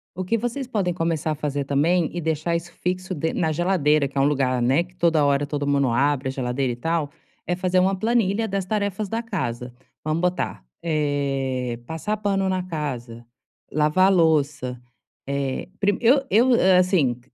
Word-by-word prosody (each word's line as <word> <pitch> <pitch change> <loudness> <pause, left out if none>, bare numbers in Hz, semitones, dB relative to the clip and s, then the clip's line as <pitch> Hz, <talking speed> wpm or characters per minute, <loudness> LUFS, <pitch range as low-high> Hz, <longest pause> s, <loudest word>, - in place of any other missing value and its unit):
o 185 - -3
que 230 +5 +1
vocês 245 +3 -3
podem 195 -8 -1
começar 165 -2 -1
a - - -1
fazer 145 -1 -2
também 155 +5 +2
e - - -1
deixar 160 +1 -1
isso 170 +1 -4
fixo 185 +1 -3
de 160 +1 -2
na 160 -2 0
geladeira, 155 -4 +2
que 140 +1 -9
é - - +4
um - - +4
lugar, 130 -3 +1
né, 130 +7 +3
que 180 0 -20
toda 165 -4 +2
hora 140 0 +2
todo 145 -1 -3
mundo 140 -3 +2
abre 135 +2 +1
a - - -2
geladeira 130 0 -1
e - - -6
tal, 160 +2 -1 0.3
é 175 - 0
fazer 185 0 +1
uma 190 +1 +2
planilha 225 0 +1
das 195 -2 -2
tarefas 205 0 -2
da 225 +3 -1
casa. 125 - -4 0.3
Vamos 155 +2 -1
botar, 180 - -1 0.2
eh, 135 -5 -1
passar 165 - -3
pano 195 -2 0
na 185 -1 -1
casa, 125 -9 -5 0.5
lavar 155 +6 +3
louça, 145 -7 +1 0.5
eh, 140 0 -2
prime 205 0 +1
eu 265 +4 +4
eu, 240 +4 +4
eh, 185 -4 +5
assim. 175 -10 +2
160 Hz, 185 wpm, -23 LUFS, 140-185 Hz, 0.5 s, eh